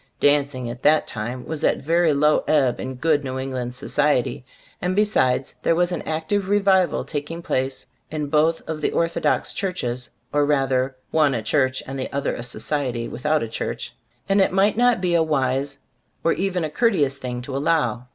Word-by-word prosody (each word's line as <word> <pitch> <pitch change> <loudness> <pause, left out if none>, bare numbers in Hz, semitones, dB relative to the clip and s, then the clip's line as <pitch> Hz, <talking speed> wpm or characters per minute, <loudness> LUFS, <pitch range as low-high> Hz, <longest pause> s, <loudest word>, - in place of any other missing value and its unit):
Dancing 140 -3 +2
at 120 +1 -7
that 155 +1 +4
time 120 +3 -5
was 160 -2 -5
at - - +4
a - - -10
very 165 +3 +2
low 150 +1 +3
ebb 140 -5 +2
in 130 0 -5
good 145 +2 +1
New 130 -1 -4
England 130 -2 -4
society, 145 -1 0 0.4
and 180 +1 0
be 210 - +5
sides, 130 -11 +1
there 165 - +2
was 175 +1 +1
an 175 - -2
active 165 +5 -1
revival 195 -3 +3
tak 145 -2 -4
ing 165 +1 -6
place 130 -2 -2 0.2
in 155 -1 -3
both 155 +3 +1
of 160 -1 -4
the - - +1
orthodox 170 0 0
churches 125 -11 -3 0.2
(or 145 0 +3
rather 135 -2 +1 0.2
one 150 -4 +3
a 115 - -3
church 130 +2 +1
and 135 +1 -6
the 130 - -4
other 140 0 -1
a - - -5
society 125 -1 -2
without 150 +3 0
a - - -3
church), 110 - -4 0.3
and 195 +1 +3
it - - +3
might 195 +3 +3
not 245 -3 +3
be 180 -2 +1
a 170 - +4
wise, 140 -2 0 0.5
nor 165 - +3
even 185 -2 -1
a 155 - -1
courteous, 150 - +1
thing 125 -1 -4
to 130 +1 -6
allow. 135 -5 0
145 Hz, 195 wpm, -23 LUFS, 130-165 Hz, 0.5 s, be